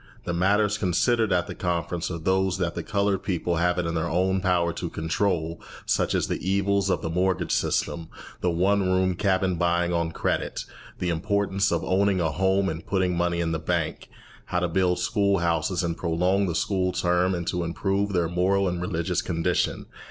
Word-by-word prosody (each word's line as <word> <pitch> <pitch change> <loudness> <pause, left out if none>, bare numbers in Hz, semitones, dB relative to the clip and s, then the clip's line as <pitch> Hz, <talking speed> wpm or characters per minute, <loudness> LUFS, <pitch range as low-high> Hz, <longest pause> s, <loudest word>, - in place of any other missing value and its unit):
The 85 - -3
matters 105 +4 +2
considered 110 +4 +2
at 90 -2 +2
the - - -6
conference 85 -1 -2
are 85 - -3
those 95 +3 +1
that 90 -2 -1
the - - -4
coloured 100 -1 0
people 90 -2 -1
have 90 +1 +1
it 90 - 0
in 85 - -2
their 85 0 -1
own 95 +2 +1
power 90 -2 +1
to - - -4
control, 80 0 -1 0.2
such - - +1
as - - +1
the - - -2
evils 100 +1 +1
of - - 0
the 80 - -2
mortgage 90 +2 0
system, 85 -1 0 0.3
the 90 - +1
one 95 +4 +2
room 95 0 +2
cabin, 95 0 +1
buying 85 0 +1
on 85 -1 0
credit, - - -2 0.3
the 90 - -2
importance 100 +3 0
of 85 -1 0
owning 95 0 +2
a 80 -2 +1
home 95 +3 +1
and 80 -2 -2
of - - -26
putting 95 -2 +1
money 85 0 0
in 85 -1 -1
the 80 - -1
bank, 80 -1 -2 0.4
how 90 - -1
to 90 - +1
build 90 +1 +1
school 100 -4 +1
houses 85 +1 0
and 85 -1 -2
prolong 90 +4 +1
the 85 - -2
school 90 +1 0
term, 90 +1 +1
and 85 -1 -4
to 90 -1 -1
improve 95 +4 -1
their 90 -3 +1
moral 95 +3 +1
and 90 -1 -2
religious 90 0 -1
condition. 85 0 -1
90 Hz, 195 wpm, -25 LUFS, 85-95 Hz, 0.4 s, matters